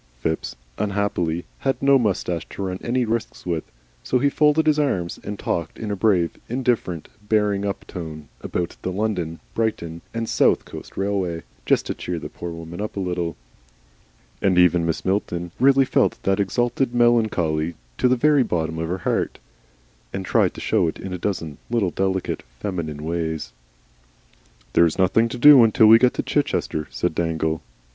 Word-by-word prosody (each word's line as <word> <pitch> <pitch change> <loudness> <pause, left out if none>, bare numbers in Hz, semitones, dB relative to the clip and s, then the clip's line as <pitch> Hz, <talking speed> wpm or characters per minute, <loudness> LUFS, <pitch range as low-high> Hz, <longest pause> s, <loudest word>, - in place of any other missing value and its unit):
Phipps, 80 +5 -2 0.2
unhappily, 100 -5 -1
had 135 -1 0
no 140 0 +5
moustache 90 -7 -1
to 100 - -6
run 95 -1 -3
any 125 +1 0
risks 115 0 -3
with, 85 -3 -1 0.4
so 125 - +1
he 140 +3 +2
folded 150 +2 +3
his 155 -1 +3
arms 90 -13 -1
and 105 0 -5
talked 85 -4 -3
in 110 -2 -4
a - - 0
brave, 95 -4 +1
indifferent, 120 - -1 0.2
bearing 105 -2 +2
up 100 - -4
tone 80 -4 -7
about 85 -1 -3
the 95 - -3
London, 90 -5 -2
Brighton, 85 -8 -2
and 115 0 -3
South - - +3
Coast - - -10
Railway, 95 -4 -1 0.2
just - - +3
to - - -2
cheer 90 - -4
the - - -6
poor 85 - -7
woman 85 +2 -7
up 105 -1 -5
a - - 0
little. 90 -3 -2 1.1
And 95 -2 +2
even 90 -1 +4
Mrs. 80 - -2
Milton 90 -3 -1
really 135 +1 +5
felt - - +2
that 95 +1 +1
exalted 120 +4 0
melancholy 90 -10 +2 0.2
to - - +4
the 125 - +4
very 145 +3 +4
bottom 80 -7 -1
of 80 0 -2
her 90 - -1
heart, - - 0 0.7
and 95 - -4
tried - - +2
to - - -7
show - - +2
it 80 - -4
in 95 - -6
a 90 - -4
dozen 85 -7 -3
little, 115 -7 +1
delicate, 95 0 -1 0.2
feminine 80 -7 -4
ways. 80 -5 -3 1.2
"There 85 - +6
is 80 - -3
nothing 95 +5 +3
to 125 - -5
do 140 0 +9
until 110 0 +5
we 110 +1 +9
get 125 0 +3
to - - -1
Chichester," 75 -1 -1
said - - -1
Dangle. 80 -1 0
"Nothing." - - -24
95 Hz, 175 wpm, -23 LUFS, 85-115 Hz, 1.2 s, do